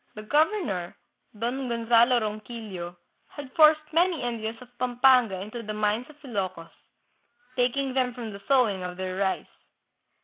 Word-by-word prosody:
The 215 - -7
governor, 290 - 0 0.4
Don 250 +4 -2
Gonzalo 235 +1 +4
Ronquillo, 210 -5 -6 0.3
had 280 -3 -10
forced 310 0 +6
many 340 -3 +2
Indians 230 -2 -3
of 250 -1 -15
Pampanga 250 -5 +4
into 215 +4 -6
the 215 -1 -5
mines 215 +3 0
of 300 -1 -16
Ilokos, 190 -9 -4 0.8
taking 255 +2 +1
them 255 -1 +1
from 230 -4 -6
the 200 - -10
sowing 245 -9 +3
of 180 0 -5
their 185 0 -4
rice. 195 -1 0
235 Hz, 140 wpm, -27 LUFS, 205-260 Hz, 0.8 s, forced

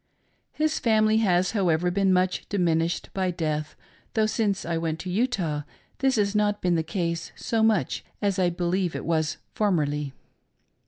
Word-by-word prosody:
His 310 0 0
family 220 -1 +3
has 185 -4 +2
however 180 -4 +1
been 195 +1 +2
much 185 0 +1
diminished 165 -3 0
by 190 -1 0
death, 155 -3 -2 0.4
though 220 -1 +3
since 210 -3 0
I 170 - -1
went 165 -1 -1
to 185 - -5
Utah 185 - 0 0.4
this 270 -1 +2
has 205 -2 +1
not 210 -1 +1
been 180 -1 +1
the 165 - +2
case 170 0 -3
so 225 -1 -1
much 220 -5 +2 0.2
as 200 -2 0
I 180 -1 +3
believe 175 +1 -1
it - - -4
was 160 -2 0 0.2
formerly. 150 -8 0
180 Hz, 160 wpm, -26 LUFS, 165-210 Hz, 0.4 s, family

